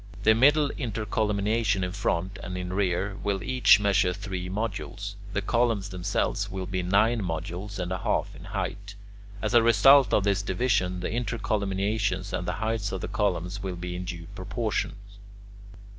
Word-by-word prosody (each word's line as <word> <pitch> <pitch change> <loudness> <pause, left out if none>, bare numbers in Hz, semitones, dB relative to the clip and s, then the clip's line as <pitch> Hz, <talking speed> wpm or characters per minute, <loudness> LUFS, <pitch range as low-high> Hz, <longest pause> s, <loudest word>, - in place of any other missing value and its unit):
The 110 - +6
middle 145 +5 +4
intercolumniations 105 -3 0
in 90 - -2
front 95 0 -2
and 90 -2 -5
in 90 0 -4
the - - -5
rear 95 0 0
will 100 -2 -1
each 130 -3 +5
measure 100 -3 +2
three 95 -2 -5
modules. 105 +2 -4 0.2
The - - -1
columns 115 -4 +1
themselves 90 -2 -1
will 95 -1 -4
be 95 0 -2
nine 105 +6 +2
modules 90 +3 -4
and 90 -1 -3
a 95 - -2
half - - -1
in 90 - -11
height. 100 0 -4 0.5
As - - -1
a 120 - +7
result 120 +5 +6
of 100 - +3
this 100 0 +1
division, 95 -3 0
the - - -2
intercolumniations 100 -3 -1
and 90 - -4
the 90 - 0
heights 110 +1 -2
of 95 - -4
the - - -3
columns 95 -1 -1
will 95 -2 -4
be 90 0 -5
in 90 +1 -5
due 85 -2 -6
proportion. 100 +4 -2
100 Hz, 170 wpm, -27 LUFS, 90-110 Hz, 0.5 s, a